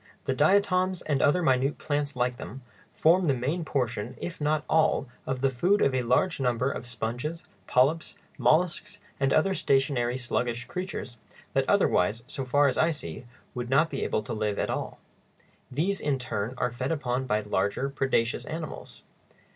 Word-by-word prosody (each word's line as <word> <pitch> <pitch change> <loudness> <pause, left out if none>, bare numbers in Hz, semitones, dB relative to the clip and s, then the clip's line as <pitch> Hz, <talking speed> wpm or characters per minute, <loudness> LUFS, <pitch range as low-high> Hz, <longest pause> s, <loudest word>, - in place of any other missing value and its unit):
The - - +1
diatoms, 185 -2 +2
and 145 -3 0
other 175 +5 +3
minute 135 0 +2
plants 145 -2 -2
like 125 0 0
them, 130 0 -8 0.3
form 175 +3 +3
the 140 - +3
main 145 +8 -1
portion, 120 -7 -2
if 170 -3 -6
not 150 +1 +1
all, 160 -3 +2 0.2
of 130 -1 -2
the 135 -1 +2
food 180 +11 +2
of 135 - +3
a 130 - +1
large 125 +9 +1
number 125 0 +1
of 120 - -6
sponges, 120 +8 -4 0.2
polyps, 145 +6 +2 0.2
mollusks, 165 +9 +2 0.2
and 135 -1 +2
other 190 +7 +3
stationary, 135 -6 +1
sluggish 120 -1 -2
creatures, 180 -9 -5 0.4
that - - +1
otherwise, 105 +6 +2
so 135 - -5
far 145 +3 +3
as 130 - 0
I 160 - +4
see, 125 - -5 0.3
would 120 -1 -4
not 155 +5 +3
be 135 - -2
able 110 - -1
to 105 - -5
live 105 -2 -1
at - - -1
all. - - -4 0.7
These, 180 +9 -1
in 145 -2 +1
turn, 120 -2 -3
are 125 - 0
fed 130 +4 -3
upon 130 -4 -1
by 105 -2 +1
larger 100 +5 0
predaceous 135 -4 0
animals. 160 -1 -7
135 Hz, 170 wpm, -27 LUFS, 120-155 Hz, 0.7 s, I